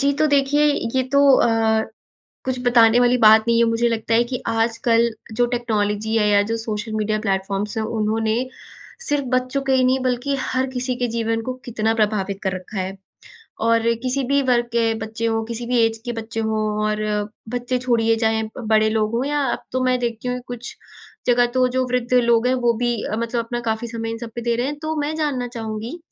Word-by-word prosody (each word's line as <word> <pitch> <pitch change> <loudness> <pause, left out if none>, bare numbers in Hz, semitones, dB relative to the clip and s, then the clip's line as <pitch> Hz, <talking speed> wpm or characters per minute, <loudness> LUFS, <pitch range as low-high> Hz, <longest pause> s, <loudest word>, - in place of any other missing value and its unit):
जी, 280 0 +3
तो 310 - +4
देखिए, 285 0 +3 0.3
ये 260 - +3
तो 280 - +4 0.2
अ, 225 -1 +2 0.6
कुछ 260 -1 -2
बताने 235 -1 +5
वाली 245 0 +4
बात 220 -1 +7
नहीं 235 0 +3
है। 235 - +5
मुझे 230 +1 +1
लगता 225 0 -1
है 235 - +5
कि 245 +1 -5
आजकल 230 +1 +2 0.3
जो 245 - +3
टेक्नोलॉजी 220 -2 -1
है 210 -1 +2
या 205 0 +5
जो 230 - 0
सोशल 215 0 -4
मीडिया 215 0 0
प्लेटफॉर्म्स 195 0 -2
हैं, 220 - 0 0.2
उन्होंने 220 +1 0 0.7
सिर्फ 290 -1 +1
बच्चों 255 +2 0
के - - +4
ही 260 -1 +3
नहीं 260 +1 +3
बल्कि 255 +2 0
हर 260 0 -1
किसी 250 0 -2
के 245 0 -1
जीवन 225 0 0
को 255 - -1
कितना 225 -2 0
प्रभावित 205 -3 0
कर 190 -2 0
रखा 185 +3 -8
है। 190 +1 -4 0.7
और 230 0 +3 0.2
किसी 260 +2 -1
भी 280 0 +4
वर्ग 240 -1 +3
के 235 0 +2 0.2
बच्चे 220 +1 -4
हों, 225 0 0
किसी 235 +1 -6
भी 245 0 +1
एज 225 0 -1
के 240 - -3
बच्चे 225 0 -5
हों, 220 -1 -1 0.2
और 215 0 -1 0.5
बच्चे 245 +1 -1
छोड़िए 230 -2 +2
चाहे 220 0 +2
अ, 220 +4 -7
बड़े 215 0 +4
लोग 215 0 0
हों, 240 +3 0
या 290 0 0
अब - - -4
तो 255 - 0
मैं 255 0 +2
देखती 235 0 -3
हूँ 250 0 -2
कुछ 245 -1 -8 0.5
जगह 245 0 +4
तो 255 0 +4
जो 260 - +2
वृद्ध 250 0 -2
लोग 235 -1 +4
हैं, 255 - +3
वो 240 -2 +2
भी 240 0 +1
अ, 215 - -3
मतलब 235 +1 -2
अपना 240 +1 -4
काफ़ी 220 +2 -3
समय 225 -1 -4
इन 230 - -5
सब 235 -1 -7
पे 240 - -4
दे 235 0 0
रहे 240 +2 -1
हैं। 290 +1 -4
तो 315 0 -2
मैं 295 +2 -2
जानना 280 -6 -1
चाहूँगी 220 +6 -5
235 Hz, 215 wpm, -21 LUFS, 220-250 Hz, 0.7 s, बात